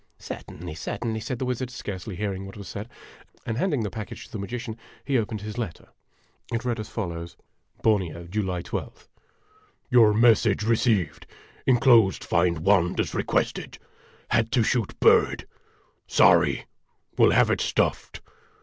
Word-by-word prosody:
" -, -, -42 dB
Certainly, 85 Hz, +1 st, -8 dB
certainly," 110 Hz, +7 st, -4 dB
said 125 Hz, +3 st, -4 dB
the 130 Hz, -, -3 dB
wizard, 125 Hz, 0 st, -2 dB
scarcely 105 Hz, -5 st, -6 dB
hearing 95 Hz, -1 st, -3 dB
what 95 Hz, -, -11 dB
was 100 Hz, -2 st, -9 dB
said; 100 Hz, +6 st, -7 dB, 0.6 s
and 115 Hz, +1 st, -2 dB
handing 145 Hz, -10 st, 0 dB
the 105 Hz, -, -3 dB
package 110 Hz, +2 st, -7 dB
to -, -, -19 dB
the 110 Hz, -, -5 dB
magician, 115 Hz, +2 st, -5 dB, 0.3 s
he 140 Hz, -, 0 dB
opened 110 Hz, -3 st, -1 dB
his 105 Hz, +3 st, -6 dB
letter. 110 Hz, -8 st, -6 dB, 0.6 s
It 115 Hz, +1 st, -2 dB
read 120 Hz, -2 st, -1 dB
as 110 Hz, -, -6 dB
follows: 85 Hz, -5 st, -5 dB, 0.5 s
BORNEO, 90 Hz, -6 st, +1 dB
July 95 Hz, -4 st, -2 dB
i2th. -, -, -6 dB, 0.8 s
Your 115 Hz, -4 st, +7 dB
message 110 Hz, -2 st, +4 dB
received. 110 Hz, -4 st, +1 dB, 0.4 s
Inclosed 120 Hz, -6 st, +5 dB
find 85 Hz, -2 st, +1 dB
wand 95 Hz, -3 st, +3 dB
as -, -, -1 dB
requested. -, -, -1 dB, 0.5 s
Had 115 Hz, 0 st, +2 dB
to 120 Hz, -, +4 dB
shoot 115 Hz, -2 st, -1 dB
bird. -, -, +4 dB, 0.6 s
Sorry. -, -, +4 dB, 0.5 s
Will -, -, +5 dB
have -, -, +4 dB
it -, -, 0 dB
stuffed. -, -, -1 dB
110 Hz, 150 wpm, -25 LUFS, 95-115 Hz, 0.8 s, Your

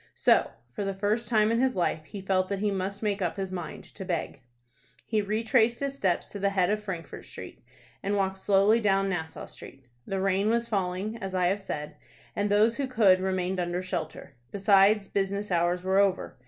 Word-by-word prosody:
So, -, -, +4 dB, 0.2 s
for 165 Hz, -, -4 dB
the 195 Hz, -1 st, -2 dB
first 210 Hz, +4 st, 0 dB
time 215 Hz, -2 st, +3 dB
in 230 Hz, -, +2 dB
his 260 Hz, 0 st, +2 dB
life, 165 Hz, -3 st, -1 dB
he 200 Hz, +5 st, -8 dB
felt 185 Hz, -1 st, 0 dB
that 200 Hz, -, -1 dB
he 205 Hz, +1 st, 0 dB
must 195 Hz, +2 st, -3 dB
make 205 Hz, -1 st, 0 dB
up 175 Hz, 0 st, -1 dB
his 190 Hz, -1 st, -3 dB
mind 175 Hz, -4 st, -6 dB
to 195 Hz, -, -7 dB
beg. 175 Hz, -4 st, -3 dB, 0.6 s
He 215 Hz, -2 st, +1 dB
retraced 220 Hz, +2 st, +2 dB
his 275 Hz, -1 st, -2 dB
steps 190 Hz, -9 st, 0 dB
to 205 Hz, -, -6 dB
the 200 Hz, 0 st, +2 dB
head 190 Hz, -1 st, +1 dB
of 210 Hz, 0 st, -1 dB
Frankfort 180 Hz, -5 st, -6 dB
Street, -, -, -10 dB, 0.4 s
and 205 Hz, +1 st, -1 dB
walked 190 Hz, -1 st, -1 dB
slowly 200 Hz, +3 st, +4 dB
down 195 Hz, -2 st, +2 dB
Nassau 160 Hz, -4 st, -4 dB
Street. 135 Hz, -, -11 dB, 0.2 s
The 195 Hz, -, -2 dB
rain 195 Hz, +2 st, +1 dB
was 235 Hz, +1 st, +1 dB
falling, 195 Hz, +1 st, -2 dB
as 195 Hz, -4 st, -5 dB
I 180 Hz, -1 st, +2 dB
have 200 Hz, +2 st, -1 dB
said, 150 Hz, -5 st, -6 dB, 0.4 s
and 205 Hz, 0 st, 0 dB
those 215 Hz, +3 st, +3 dB
who 275 Hz, -, -1 dB
could 210 Hz, -7 st, +4 dB
remained 185 Hz, 0 st, -1 dB
under 175 Hz, +1 st, -2 dB
shelter. 170 Hz, -6 st, -5 dB, 0.2 s
Besides, 200 Hz, +1 st, +4 dB
business 200 Hz, +1 st, -2 dB
hours 175 Hz, +1 st, +1 dB
were 190 Hz, +1 st, +2 dB
over. 195 Hz, -8 st, 0 dB
195 Hz, 200 wpm, -28 LUFS, 185-210 Hz, 0.6 s, So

